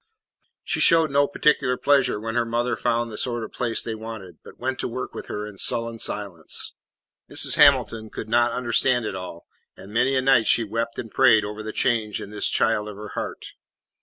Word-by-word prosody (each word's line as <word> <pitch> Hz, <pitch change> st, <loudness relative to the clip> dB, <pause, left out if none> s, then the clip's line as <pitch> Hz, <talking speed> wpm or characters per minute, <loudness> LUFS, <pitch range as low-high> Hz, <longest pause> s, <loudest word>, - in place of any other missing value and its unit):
She -, -, -2 dB
showed 165 Hz, -3 st, +5 dB
no 140 Hz, +1 st, +3 dB
particular 145 Hz, -3 st, +1 dB
pleasure 135 Hz, -6 st, +2 dB
when 115 Hz, +1 st, -4 dB
her 120 Hz, 0 st, +1 dB
mother 120 Hz, +1 st, -1 dB
found 120 Hz, -1 st, -1 dB
the 105 Hz, -, -7 dB
sort 120 Hz, -2 st, -2 dB
of 110 Hz, -, -8 dB
place 115 Hz, -2 st, 0 dB
they 115 Hz, -, -4 dB
wanted, 110 Hz, -6 st, -9 dB
but -, -, -14 dB
went 130 Hz, +1 st, -3 dB
to -, -, -2 dB
work 125 Hz, +2 st, -6 dB
with -, -, -8 dB
her 105 Hz, 0 st, -4 dB
in 105 Hz, -2 st, -10 dB
sullen 115 Hz, -1 st, 0 dB
silence. 100 Hz, -8 st, -2 dB, 0.6 s
Mrs. -, -, +2 dB
Hamilton 110 Hz, -1 st, +4 dB
could 110 Hz, -, -7 dB
not 120 Hz, +2 st, +2 dB
understand 120 Hz, 0 st, +1 dB
it 105 Hz, -, -3 dB
all, 90 Hz, -2 st, -8 dB, 0.3 s
and 100 Hz, +2 st, -12 dB
many 125 Hz, +4 st, +2 dB
a 130 Hz, -, +2 dB
night 130 Hz, -4 st, +4 dB
she 115 Hz, -, +4 dB
wept 115 Hz, +2 st, -3 dB
and 115 Hz, -, -6 dB
prayed 110 Hz, -5 st, +4 dB
over 105 Hz, +1 st, -6 dB
the 110 Hz, 0 st, -5 dB
change 110 Hz, -4 st, 0 dB
in 100 Hz, -, -8 dB
this 105 Hz, -, 0 dB
child 105 Hz, -2 st, +1 dB
of 105 Hz, -, -9 dB
her 105 Hz, +1 st, -9 dB
heart. -, -, -6 dB
115 Hz, 205 wpm, -23 LUFS, 105-125 Hz, 0.6 s, showed